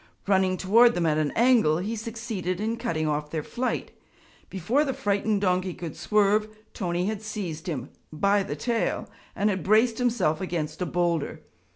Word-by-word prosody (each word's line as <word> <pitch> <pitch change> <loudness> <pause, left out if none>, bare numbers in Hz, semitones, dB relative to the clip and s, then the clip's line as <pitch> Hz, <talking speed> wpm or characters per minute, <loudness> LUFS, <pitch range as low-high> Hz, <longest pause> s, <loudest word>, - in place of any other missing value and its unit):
Running 190 -2 +2
toward 230 +6 +5
them 175 -1 0
at 155 -1 +2
an 150 -2 0
angle, 230 -10 +4
he 205 +6 -3
succeeded 220 -5 -4
in 220 +2 -1
cutting 165 -10 -1
off 150 0 -1
their 155 -1 -3
flight. 250 +8 -3 0.6
Before 215 - +1
the 270 -3 -2
frightened 205 0 0
donkey 185 -1 0
could 165 -3 -6
swerve, 210 0 +2 0.3
Tony 175 -2 -1
had 215 0 -2
seized 190 -6 -5
him 140 -7 -4 0.2
by 200 +6 +2
the 145 -6 -4
tail 230 +8 -1 0.3
and 210 +1 +2
had 190 -2 -2
braced 220 +6 +3
himself 235 -10 +1
against 165 -3 -3
a 180 - 0
boulder. 170 -2 -1
190 Hz, 170 wpm, -26 LUFS, 170-220 Hz, 0.6 s, toward